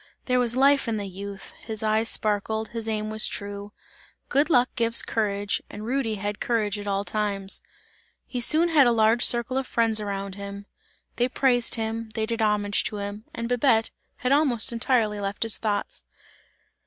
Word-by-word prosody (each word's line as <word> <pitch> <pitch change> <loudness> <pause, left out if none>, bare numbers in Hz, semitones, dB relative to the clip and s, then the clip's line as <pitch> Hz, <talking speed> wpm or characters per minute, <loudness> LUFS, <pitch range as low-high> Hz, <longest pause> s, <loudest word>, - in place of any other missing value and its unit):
There 250 -1 +2
was 240 -1 +3
life 275 0 +4
in 225 -1 -1
the 205 - -4
youth; 195 +1 -8
his 220 -1 -5
eyes 220 +1 +1
sparkled, 220 +1 -1
his 225 -1 -4
aim 215 0 -2
was 220 0 +7
true. 200 0 -6 0.6
Good 285 +4 +2
luck 250 -5 +4
gives 230 -1 +3
courage, 205 -2 -1
and 210 +1 -8
Rudy 240 -2 -1
had 205 +1 -4
courage 215 -3 -1
at 205 - -7
all 200 0 0
times; 200 -2 -1 0.6
he 245 - -4
soon 320 +7 +3
had 295 -6 +5
a - - +4
large 225 +1 +3
circle 240 +2 +2
of 265 - -5
friends 225 -2 +1
around 200 -2 -4
him, 200 0 -8 0.5
they 245 +1 +1
praised 245 -3 +1
him, 225 0 -3
they 220 - 0
did 230 0 -3
homage 210 -1 +1
to 210 - -3
him, 205 +2 -6
and 230 - -3
Babette 240 -2 +2 0.2
had 255 - -2
almost 275 -6 +3
entirely 230 -3 +1
left 200 +1 -2
his 225 -2 0
thoughts. 205 -2 -3
220 Hz, 180 wpm, -25 LUFS, 205-240 Hz, 0.6 s, was